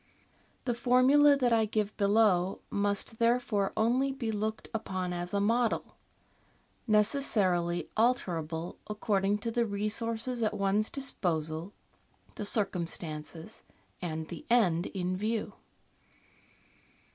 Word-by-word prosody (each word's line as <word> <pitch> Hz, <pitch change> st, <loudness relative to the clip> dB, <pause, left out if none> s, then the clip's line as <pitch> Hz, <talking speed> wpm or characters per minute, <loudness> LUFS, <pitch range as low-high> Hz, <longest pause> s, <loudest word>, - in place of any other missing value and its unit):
The 245 Hz, -, +1 dB
formula 265 Hz, +4 st, +5 dB
that 245 Hz, -3 st, +2 dB
I 225 Hz, -1 st, +3 dB
give 210 Hz, -1 st, -2 dB
below 200 Hz, -3 st, +2 dB
must 205 Hz, +2 st, -2 dB
therefore 230 Hz, -4 st, +1 dB
only 250 Hz, +5 st, +2 dB
be 250 Hz, -5 st, -3 dB
looked 215 Hz, +1 st, -3 dB
upon 185 Hz, -5 st, -3 dB
as 175 Hz, 0 st, -4 dB
a 200 Hz, -, 0 dB
model, 230 Hz, +3 st, 0 dB, 0.9 s
necessarily 195 Hz, -, +2 dB
alterable 175 Hz, -8 st, -1 dB
according 205 Hz, -1 st, 0 dB
to 230 Hz, -, 0 dB
the 235 Hz, 0 st, +1 dB
resources 225 Hz, +4 st, -2 dB
at 215 Hz, -1 st, 0 dB
one's 200 Hz, +2 st, +1 dB
disposal, 165 Hz, -, -2 dB, 0.6 s
the 210 Hz, -, -4 dB
circumstances, 170 Hz, -6 st, -1 dB, 0.4 s
and 160 Hz, -3 st, -4 dB
the 170 Hz, -, -8 dB
end 185 Hz, -8 st, +3 dB
in 185 Hz, -1 st, -3 dB
view. 215 Hz, +3 st, -2 dB
210 Hz, 110 wpm, -30 LUFS, 180-230 Hz, 0.9 s, formula